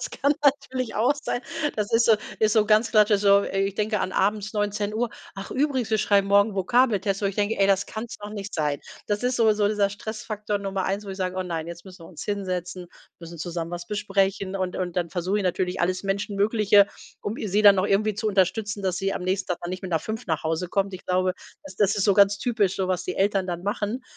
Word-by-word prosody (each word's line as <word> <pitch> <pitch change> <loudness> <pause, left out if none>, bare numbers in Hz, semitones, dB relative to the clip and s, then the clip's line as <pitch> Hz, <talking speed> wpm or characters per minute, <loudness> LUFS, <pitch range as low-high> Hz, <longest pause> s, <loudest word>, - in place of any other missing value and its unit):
das - - -5
kann 280 +1 +1
natürlich 270 -3 +1
auch 245 +7 +3
sein. 275 - -3 0.4
Das 210 -1 -2
ist 230 0 +4
so 225 - +7 0.3
ist 215 -1 +3
so 215 -2 +4
ganz 215 +2 +3
klassisch, 210 -2 +4
so, 200 0 +5
äh, 195 - -2
ich 195 0 0
denke 210 0 0
an - - -1
abends 205 +2 0
19:00: 210 +2 -1 0.3
„Ach 195 - -7
übrigens, 265 -5 0
wir 220 - +2
schreiben 200 -1 +3
morgen 200 +1 +4
Vokabeltest.“ 205 -2 +2
Wo - - +2
ich 195 - -3
denke: 210 +2 0
„Ey, 195 - +4
das 195 0 +2
kann's 220 +2 -6
noch 205 0 -7
nicht 205 -1 -6
sein.“ 150 -3 -1 0.3
Das 205 +1 -1
ist 250 0 0
so 225 -2 +4
so 210 -1 +1
dieser 205 -1 +2
Stressfaktor 210 0 -4
Nummer 195 -1 -3
1, 200 +2 -2
wo 200 - -7
ich 190 - -6
sage: 185 -1 -3
„Oh 185 - 0
nein, 165 -3 -4
jetzt 170 0 -9
müssen 185 -2 -13
wir - - -12
uns 165 - -9
hinsetzen, 185 -3 -3 0.3
müssen 170 0 -10
zusammen 170 0 -4
was 175 0 -6
besprechen.“ 195 -1 -1
Und 185 -1 -3
und 180 -2 -3
dann 175 -2 -1
versuche 185 +2 -1
ich 205 - -2
natürlich 180 0 -1
alles 185 +1 0
Menschenmögliche, 200 +1 +3 0.3
um 210 +3 -4
i - - -4
sie 205 +2 +1
dann 200 -2 +8
auch 185 - +2
irgendwie 210 +2 +1
zu 210 +2 -3
unterstützen, 205 +1 0
dass 185 -2 0
sie 195 +1 -1
am - - -4
nächsten 185 +1 -1
Tag 180 - -1
dann 175 - -4
nicht 185 +1 -5
mit 185 -3 -3
5 220 +7 -5
nach 160 -4 -1
Hause 165 +3 -1
kommt. 195 +1 0
Ich 185 - -10
glaube, 185 0 +1 0.3
das 290 - -12
das 205 -1 +3
ist 200 -3 0
so 200 - +4
ganz 200 0 +5
typisch 215 -6 0
so, 190 -1 -2
was 185 -1 -1
die 180 - -3
Eltern 195 -1 +1
dann 175 -1 -4
machen. 205 +4 -2
200 Hz, 245 wpm, -25 LUFS, 185-215 Hz, 0.4 s, dann